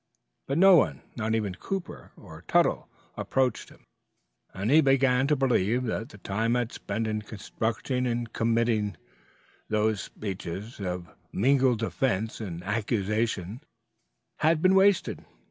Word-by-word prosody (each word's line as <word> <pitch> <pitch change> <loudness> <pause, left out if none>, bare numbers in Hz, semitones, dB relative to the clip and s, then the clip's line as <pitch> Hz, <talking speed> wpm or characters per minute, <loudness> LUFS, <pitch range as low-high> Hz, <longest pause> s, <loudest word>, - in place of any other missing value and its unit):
But 140 - -1
no 190 0 +8
one - - +1
not 110 -1 -1
even 105 -4 -1
Cooper 190 - -6
or - - -13
Tuttle - - +2 0.3
approached 130 -1 -1
him, - - -20 0.7
and 100 +6 -2
he 155 +2 +7
began 135 -2 +3
to 150 - +3
believe 125 -3 +1
that 115 -1 -3
the 105 - -13
time 110 +4 -1
he - - +2
had 120 -1 -1
spent 110 +3 -3
in 110 -1 -2
constructing 110 +4 -3
and 120 -1 -3
committing 115 -4 +1 0.7
those 110 -2 +1
speeches 100 +2 -6
of 90 -3 -5 0.2
mingled 130 +2 +3
defense 110 -2 -1
and 90 -5 -6
accusation 105 0 -1 0.8
had 160 +1 +3
been 185 +3 +4
wasted. 195 -1 +3
115 Hz, 135 wpm, -27 LUFS, 105-130 Hz, 0.8 s, no